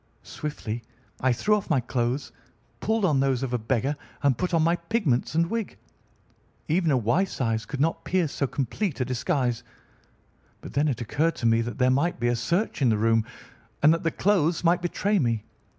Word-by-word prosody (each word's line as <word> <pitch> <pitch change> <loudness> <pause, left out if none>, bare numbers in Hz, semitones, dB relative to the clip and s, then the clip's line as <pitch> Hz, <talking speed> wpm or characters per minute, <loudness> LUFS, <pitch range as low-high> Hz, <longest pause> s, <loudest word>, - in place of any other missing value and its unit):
Swiftly 120 -6 -5 0.4
I 130 - +2
threw 210 - +2
off 205 - -4
my 150 -5 +3
clothes, 120 +2 -2 0.5
pulled 220 -1 +1
on 150 -7 +2
those 135 -1 +1
of 125 -2 -3
a 125 - +1
beggar, 130 +5 0 0.3
and 140 -3 +4
put 180 +9 -2
on 165 -2 +3
my 170 +2 +3
pigments 170 - 0
and 165 +1 +4
wig. 225 +1 -3 0.9
Even 165 +1 +2
a 135 - +3
wife's 140 - 0
eyes 115 -3 -1
could 140 - -5
not 160 +3 0
pierce 175 -5 0
so 140 - -1
complete 145 - -2
a 125 - +1
disguise. 125 -1 -1 1.0
But - - -10
then 145 +3 +2
it 125 -5 -1
occurred 150 +8 0
to - - -5
me 115 0 +4
that 115 -1 -4
there 125 0 +3
might 145 +5 +1
be 120 +1 +1
a 120 - +2
search 170 - -1
in 130 - +4
the 110 - +2
room, 115 +1 +2 0.6
and 155 +2 +7
that 165 - -1
the 165 - +1
clothes 175 -2 +1
might 175 +1 +3
betray 195 +4 0
me. 115 -6 0
140 Hz, 200 wpm, -26 LUFS, 120-170 Hz, 1.0 s, and